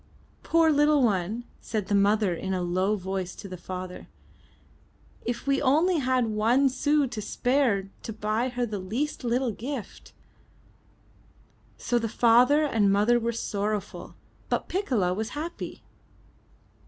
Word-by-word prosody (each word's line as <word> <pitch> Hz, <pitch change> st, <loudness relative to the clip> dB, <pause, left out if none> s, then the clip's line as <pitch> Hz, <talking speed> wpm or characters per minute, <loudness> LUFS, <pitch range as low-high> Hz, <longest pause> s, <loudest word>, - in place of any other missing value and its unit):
'Toor 330 Hz, -1 st, +3 dB
little 295 Hz, -1 st, +4 dB
one/* 210 Hz, +1 st, 0 dB, 0.2 s
said 215 Hz, -3 st, -3 dB
the 205 Hz, -, -1 dB
mother 200 Hz, -1 st, +3 dB
in 190 Hz, +3 st, -3 dB
a 180 Hz, -, -1 dB
low 185 Hz, +4 st, +1 dB
voice 190 Hz, -1 st, -4 dB
to 205 Hz, -, -9 dB
the 185 Hz, -, -7 dB
father, 185 Hz, 0 st, -7 dB, 1.2 s
if 240 Hz, -1 st, -3 dB
we 275 Hz, -1 st, +1 dB
only 315 Hz, +6 st, +3 dB
had 255 Hz, -2 st, +1 dB
one 230 Hz, +5 st, +2 dB
sou 290 Hz, +2 st, +2 dB
to 220 Hz, -4 st, -5 dB
spare 245 Hz, -4 st, +1 dB
to -, -, -6 dB
buy 220 Hz, +3 st, -1 dB
her 245 Hz, -1 st, -2 dB
the 210 Hz, -3 st, -4 dB
least 235 Hz, +13 st, -3 dB
little 245 Hz, +1 st, 0 dB
gift/* 240 Hz, +2 st, -7 dB, 1.7 s
So 240 Hz, -, 0 dB
the 225 Hz, -1 st, -2 dB
father 245 Hz, +7 st, +4 dB
and 215 Hz, -8 st, +2 dB
mother 210 Hz, +5 st, +3 dB
were 235 Hz, 0 st, -1 dB
sorrowful, 210 Hz, -2 st, -4 dB, 0.3 s
but -, -, -1 dB
Piccola 245 Hz, -, 0 dB
was 220 Hz, +8 st, -4 dB
happy. 330 Hz, +4 st, -6 dB
230 Hz, 140 wpm, -27 LUFS, 200-265 Hz, 1.7 s, little